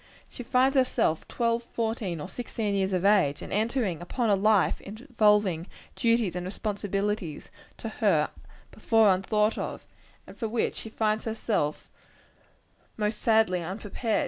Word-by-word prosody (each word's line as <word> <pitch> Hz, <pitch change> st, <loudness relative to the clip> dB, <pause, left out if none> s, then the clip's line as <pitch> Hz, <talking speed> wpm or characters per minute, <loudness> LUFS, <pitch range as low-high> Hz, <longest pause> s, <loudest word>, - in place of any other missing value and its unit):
She -, -, -10 dB
finds 260 Hz, +3 st, +2 dB
herself 255 Hz, -11 st, +1 dB
twelve, 235 Hz, -1 st, 0 dB
fourteen 225 Hz, -7 st, -3 dB
or 150 Hz, -, -5 dB
sixteen 215 Hz, 0 st, -3 dB
years 195 Hz, -1 st, 0 dB
of 185 Hz, 0 st, 0 dB
age, 185 Hz, -9 st, +3 dB
and -, -, -7 dB
entering 215 Hz, -, 0 dB
upon 225 Hz, +5 st, -1 dB
a -, -, +5 dB
life 205 Hz, 0 st, +2 dB
involving 210 Hz, -, +1 dB, 0.3 s
duties 230 Hz, -6 st, +1 dB
and 180 Hz, -, -3 dB
responsibilities, 200 Hz, -3 st, -3 dB, 0.3 s
to -, -, -6 dB
her -, -, +1 dB, 0.4 s
before 225 Hz, -4 st, +4 dB
unthought 210 Hz, +3 st, +1 dB
of -, -, -5 dB, 0.4 s
and -, -, -12 dB
for 225 Hz, -, -3 dB
which 230 Hz, +1 st, 0 dB
she 225 Hz, -, -6 dB
finds 215 Hz, 0 st, 0 dB
herself 220 Hz, -9 st, -2 dB, 1.1 s
most 210 Hz, 0 st, -1 dB
sadly 220 Hz, -5 st, +3 dB
unprepared. 205 Hz, +5 st, -2 dB
210 Hz, 140 wpm, -27 LUFS, 190-230 Hz, 1.1 s, a